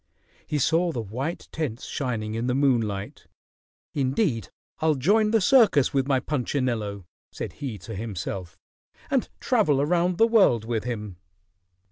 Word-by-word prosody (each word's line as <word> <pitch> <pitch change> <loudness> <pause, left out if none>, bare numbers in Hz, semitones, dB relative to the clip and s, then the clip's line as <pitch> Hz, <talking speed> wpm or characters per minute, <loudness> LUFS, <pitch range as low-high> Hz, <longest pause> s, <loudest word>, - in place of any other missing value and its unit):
He 150 - -1
saw 165 +5 +2
the 125 - -4
white 130 - -4
tents 135 -7 -4
shining 115 -6 -3
in 115 +2 -2
the 125 - +1
moonlight. 115 -8 0 0.7
"Indeed, 130 - 0 0.3
I'll 155 -1 +2
join 210 - +3
the 225 +1 +3
circus 205 - +4
with 135 -1 +1
my 135 -2 +3
Punchinello," 120 - -2 0.3
said - - -6
he 130 -7 -5
to 100 +5 -9
himself, 95 -4 -5 0.5
"and - - +1
travel 145 -3 +2
around 175 +4 +1
the 225 - +6
world 195 - +4
with 115 -1 -2
him." 105 -6 -5
130 Hz, 140 wpm, -25 LUFS, 110-160 Hz, 0.7 s, the